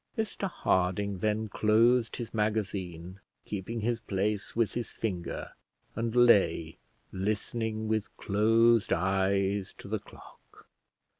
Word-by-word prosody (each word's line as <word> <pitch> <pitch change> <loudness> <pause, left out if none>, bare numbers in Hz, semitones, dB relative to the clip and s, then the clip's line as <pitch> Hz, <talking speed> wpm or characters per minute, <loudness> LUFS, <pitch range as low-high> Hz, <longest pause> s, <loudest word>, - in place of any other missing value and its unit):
Mr 210 -3 -2
Harding 95 - 0
then 110 +2 0
closed 115 +3 +3
his 120 -2 -6
magazine, 95 -5 -2 0.3
keeping 105 +3 -4
his 120 +1 0
place 105 0 -2
with 115 -2 +1
his 120 -1 -3
finger, 90 -6 -4 0.4
and 115 +1 -2
lay, 100 -9 +4 0.3
listening 110 +3 -2
with 110 -1 -2
closed 115 +2 +3
eyes 95 +2 +1
to - - -11
the - - -2
clock. - - -17
105 Hz, 115 wpm, -29 LUFS, 95-115 Hz, 0.4 s, lay